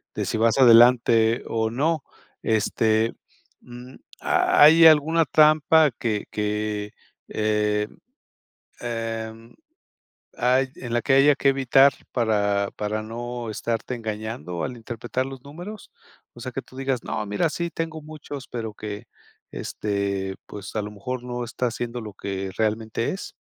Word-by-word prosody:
de -, -, -2 dB
si -, -, -2 dB
vas 115 Hz, +2 st, +2 dB
adelante 120 Hz, -2 st, +6 dB
o 110 Hz, -1 st, 0 dB
no. 150 Hz, +6 st, 0 dB, 0.4 s
Este, 110 Hz, +1 st, +1 dB, 0.5 s
mm, 125 Hz, +1 st, -12 dB, 0.3 s
¿ha -, -, +3 dB
hay 160 Hz, +2 st, +8 dB
alguna 160 Hz, +1 st, +5 dB
trampa 155 Hz, 0 st, +5 dB
que 115 Hz, -4 st, -3 dB
que, 105 Hz, 0 st, -2 dB, 0.3 s
eh, 105 Hz, -1 st, 0 dB, 0.9 s
em, 115 Hz, -1 st, -5 dB, 0.9 s
ay 130 Hz, +2 st, +3 dB
en 120 Hz, -2 st, -7 dB
la 120 Hz, -, +1 dB
que 135 Hz, -, +1 dB
haya 140 Hz, +2 st, +6 dB
que 140 Hz, -, +2 dB
evitar 135 Hz, 0 st, +4 dB, 0.2 s
para 100 Hz, -4 st, +1 dB
para 105 Hz, +1 st, -2 dB
no 120 Hz, +1 st, -6 dB
estarte 115 Hz, +3 st, -3 dB
engañando 110 Hz, -5 st, -5 dB
al 125 Hz, -, -4 dB
interpretar 120 Hz, +2 st, -4 dB
los 135 Hz, -1 st, -9 dB
números? 175 Hz, +9 st, -10 dB, 0.4 s
O -, -, -14 dB
sea, -, -, -6 dB
que -, -, -4 dB
tú -, -, -18 dB
digas: 135 Hz, -2 st, -2 dB
"No, 110 Hz, -, -3 dB
mira, 105 Hz, +11 st, 0 dB
sí 170 Hz, +2 st, -3 dB
tengo 160 Hz, -1 st, -5 dB
muchos". 145 Hz, -3 st, -9 dB
Pero 110 Hz, -3 st, -5 dB
que, 105 Hz, -1 st, -7 dB, 0.5 s
este, 100 Hz, -, -3 dB
pues 100 Hz, 0 st, -9 dB
a 110 Hz, -, 0 dB
lo 105 Hz, 0 st, -6 dB
mejor 120 Hz, +5 st, -5 dB
no 125 Hz, 0 st, -4 dB
está 120 Hz, +1 st, -2 dB
siendo 120 Hz, 0 st, -5 dB
lo 105 Hz, -2 st, -8 dB
que 95 Hz, 0 st, -5 dB
realmente 110 Hz, +1 st, -1 dB
es. 195 Hz, -, -6 dB
115 Hz, 145 wpm, -24 LUFS, 110-135 Hz, 0.9 s, hay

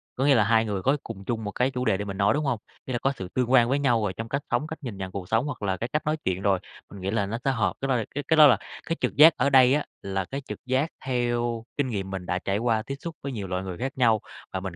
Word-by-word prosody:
có 135 Hz, -, 0 dB
nghĩa 140 Hz, -1 st, +6 dB
là 110 Hz, -, +5 dB
hai 115 Hz, +1 st, +3 dB
người 100 Hz, -3 st, -2 dB
có 135 Hz, +8 st, +2 dB
cùng 100 Hz, -, -8 dB
chung 110 Hz, 0 st, -2 dB
một 105 Hz, -, -3 dB
cái 125 Hz, +6 st, 0 dB
chủ 125 Hz, -1 st, -3 dB
đề 110 Hz, -5 st, +2 dB
để 105 Hz, -, -4 dB
mình 100 Hz, -1 st, -5 dB
nói, 100 Hz, 0 st, +3 dB
đúng 150 Hz, +1 st, -1 dB
hông? 125 Hz, -5 st, 0 dB, 0.3 s
Ý 130 Hz, -, -4 dB
là 120 Hz, -, 0 dB
có 135 Hz, -, +1 dB
sự 95 Hz, -, -5 dB
tương 125 Hz, +4 st, -1 dB
quan 120 Hz, -2 st, +6 dB
với 140 Hz, +2 st, +2 dB
nhau 120 Hz, -6 st, +2 dB
rồi 100 Hz, -3 st, -1 dB
trong 115 Hz, +3 st, -6 dB
cách 140 Hz, +3 st, -1 dB
sống, 120 Hz, +5 st, +1 dB
cách 160 Hz, -1 st, -7 dB
nhìn 115 Hz, -7 st, -5 dB
nhận 95 Hz, -1 st, -5 dB
cuộc 95 Hz, -2 st, -6 dB
sống 115 Hz, +4 st, +2 dB
hoặc 145 Hz, -, -5 dB
là 95 Hz, -2 st, -1 dB
cái 120 Hz, -, -4 dB
cách 150 Hz, -, 0 dB
nói 155 Hz, +1 st, +1 dB
chuyện 95 Hz, 0 st, 0 dB
rồi, 100 Hz, -2 st, +2 dB, 0.3 s
mình 100 Hz, -, -10 dB
nghĩ 95 Hz, +1 st, -2 dB
là 100 Hz, -2 st, +1 dB
nó 110 Hz, +4 st, -3 dB
sẽ 135 Hz, -, +3 dB
hợp. 115 Hz, -5 st, 0 dB
Cái 135 Hz, -, -1 dB
đó 130 Hz, -, +2 dB
là 115 Hz, -3 st, -1 dB
cái 145 Hz, -, -2 dB
cái 160 Hz, -, +3 dB
đó 155 Hz, -1 st, +10 dB
là 125 Hz, -6 st, +5 dB, 0.3 s
cái 165 Hz, -, -1 dB
trực -, -, 0 dB
giác 155 Hz, +2 st, +8 dB
ở -, -, +2 dB
đây 130 Hz, -1 st, +6 dB
á, 150 Hz, 0 st, +1 dB, 0.2 s
là 95 Hz, -1 st, -2 dB
cái 135 Hz, +8 st, -5 dB
trực -, -, -8 dB
giác 130 Hz, +5 st, +1 dB, 0.2 s
theo 120 Hz, -2 st, -1 dB
kinh 145 Hz, -2 st, +1 dB
nghiệm 100 Hz, -5 st, -3 dB
mình 95 Hz, -2 st, -5 dB
đã 90 Hz, +1 st, -1 dB
trải 100 Hz, +1 st, -1 dB
qua 115 Hz, 0 st, +1 dB
tiếp 135 Hz, +5 st, -5 dB
xúc 165 Hz, +1 st, -6 dB
với 140 Hz, -, -3 dB
nhiều 105 Hz, -6 st, -5 dB
loại 90 Hz, 0 st, -2 dB
người 95 Hz, -2 st, -6 dB
khác 135 Hz, +4 st, -4 dB
nhau, 115 Hz, -4 st, +3 dB, 0.3 s
và 95 Hz, -, -1 dB
mình 95 Hz, -2 st, -6 dB
120 Hz, 330 wpm, -26 LUFS, 100-135 Hz, 0.3 s, đó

